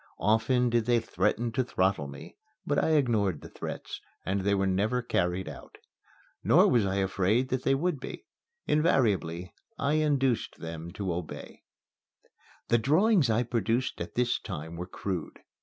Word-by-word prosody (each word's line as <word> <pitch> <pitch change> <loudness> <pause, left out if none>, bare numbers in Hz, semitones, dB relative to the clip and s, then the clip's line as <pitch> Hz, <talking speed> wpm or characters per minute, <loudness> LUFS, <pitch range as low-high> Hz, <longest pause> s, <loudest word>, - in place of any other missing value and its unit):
Often 115 +4 +2
did 120 -1 +1
they 120 -1 +4
threaten 115 +1 0
to 130 +3 0
throttle 95 - 0
me; 70 0 -10 0.3
but 145 - +1
I 160 - +2
ignored 110 - +2
the - - -10
threats, - - -7 0.2
and 95 +1 0
they 100 +1 +2
were 95 0 +1
never 105 +6 +1
carried 90 -4 0
out. - - -10 0.7
Nor - - +6
was 115 -5 +3
I 95 - -1
afraid 100 +6 +1
that 130 0 -1
they 135 - +2
would 160 +1 -1
be. - - -8 0.4
Invariably 100 - +1 0.2
I 140 +1 0
induced 135 -5 +1
them 80 0 -7
to 95 -4 -2
obey. 85 -3 -7 1.1
The 120 - +4
drawings 160 - +3
I 115 +2 +2
produced 120 +2 -1
at - - -6
this 125 0 +1
time 80 -4 -6
were 90 +1 -5
crude. 90 -4 -5
110 Hz, 155 wpm, -29 LUFS, 95-125 Hz, 1.1 s, Nor